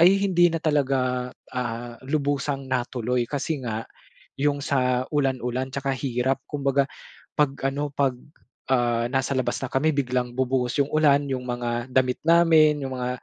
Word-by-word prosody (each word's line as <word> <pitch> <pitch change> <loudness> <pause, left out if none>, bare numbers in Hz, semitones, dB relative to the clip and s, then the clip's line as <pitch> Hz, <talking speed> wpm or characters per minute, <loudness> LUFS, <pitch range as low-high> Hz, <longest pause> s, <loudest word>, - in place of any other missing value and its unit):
ay 190 +3 +6
hindi 175 -3 +4
na 165 - -1
talaga, 130 -4 0 0.2
ah, 120 -1 -4
lubusang 140 -1 -1
natuloy 125 -1 -1
kasi 145 +3 -3
nga 115 -1 -4 0.5
'yung 145 +1 +1
sa 125 -2 0
ulan-ulan 130 -2 -1
'tsaka 135 0 -2
hirap 130 0 -1
kumbaga 140 -1 +1 0.5
pag 140 -2 +2
ano, 140 +2 -1
pag, 135 -2 +1 0.6
ah, 120 -2 +2
nasa 135 +2 0
labas 130 - 0
na 135 - -6
kami 155 +4 +2
biglang 125 -2 0
bubuhos 130 -1 0
'yung 140 - +1
ulan. 145 -2 +4
Yung 130 -1 -2
mga 120 0 -2
damit 125 -1 +2
namin, 160 -3 +5
'yung 130 - -4
mga 125 0 -3
135 Hz, 150 wpm, -25 LUFS, 125-145 Hz, 0.6 s, ay